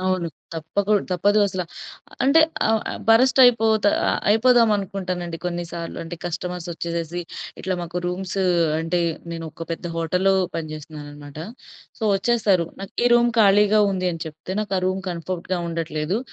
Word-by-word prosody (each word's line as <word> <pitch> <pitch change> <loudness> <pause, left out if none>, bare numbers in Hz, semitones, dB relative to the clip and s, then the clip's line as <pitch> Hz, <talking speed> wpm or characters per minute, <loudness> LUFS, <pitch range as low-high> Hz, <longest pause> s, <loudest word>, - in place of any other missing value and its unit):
అవును. 185 -2 0 0.3
తప్పకు 195 +6 -1 0.2
తప్పదు 205 +4 +2
అసలా. 185 -2 -3 0.6
అంటే 295 +4 +6 0.3
ఆహ్, 220 -1 +2
ఆహ్, - - -5
బరస్ట్ 250 +4 +5
అయిపోతా 220 -4 +4 0.2
ఆహ్, - - 0
అయిపోదామనుకుంటానండి 200 -7 +2
కొన్నిసార్లు. 175 -1 -4
అంటే 165 +1 -7
కస్టమర్స్ 175 0 -4
వచ్చేసేసి 170 +1 -4 0.4
ఇట్లా 185 0 -1
మాకు 175 +1 -4
రూమ్సు 190 +1 -2 0.4
అంటే 165 +2 0 0.3
నేనొక 165 0 -6
పెద్ద 170 +1 -5
హోటల్‌లో 180 +4 +2 0.2
పనిచేస్తున్నానఅన్నమాట. 150 -2 -8 0.6
సో, - - -12
వచ్చేస్తారు. 200 -6 +2
నాకు, 195 - -8
"ఈ - - +6
రూమ్ 240 0 +4
ఖాళీగా 210 +1 +5
ఉంది" 185 -1 -1
అని 165 - -5
చెప్తే, 160 +4 -7
నాకు 205 -2 -3
ఆ - - -1
రూమ్ 185 +1 -1
కంఫర్ట్‌గా 175 +1 -3
ఉండట్లేదు. 165 +3 -2
180 Hz, 135 wpm, -23 LUFS, 165-205 Hz, 0.6 s, అంటే